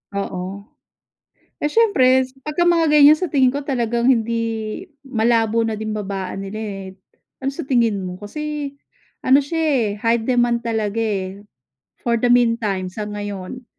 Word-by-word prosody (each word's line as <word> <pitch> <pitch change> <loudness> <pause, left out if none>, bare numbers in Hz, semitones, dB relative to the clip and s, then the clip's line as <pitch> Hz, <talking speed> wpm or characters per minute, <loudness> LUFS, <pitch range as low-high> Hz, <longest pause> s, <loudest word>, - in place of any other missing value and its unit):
Oo. 195 0 -4 1.0
Eh - - -1
siyempre 280 - +4 0.2
pagka 300 +3 0
mga 335 -2 +4
ganyan 300 +1 +7
sa 365 -4 -2
tingin 265 -3 +4
ko, 285 +2 -4
talagang 235 -3 0
hindi 235 -3 +2 0.7
malabo 230 -3 +1
na 225 - -1
din 215 0 -4
babaan 195 -2 -4
nila 215 +2 -6
eh, 195 -3 -5 0.6
Ano 270 - 0
sa 275 - -7
tingin 235 -6 +2
mo? 180 - -5
Kasi 300 +5 -4 0.6
ano 265 +2 +6
siya 325 +4 -4
eh, 280 -6 +2 0.2
high 230 +1 +1
demand 240 -1 +1
talaga 225 -1 -1
eh, 195 -2 -3 0.6
for 235 -1 +1
the 245 - +1
mean 240 -1 +4
time, 195 -5 -2
sa 210 +2 -5
ngayon. 205 +3 -6
235 Hz, 150 wpm, -20 LUFS, 205-265 Hz, 1.0 s, ganyan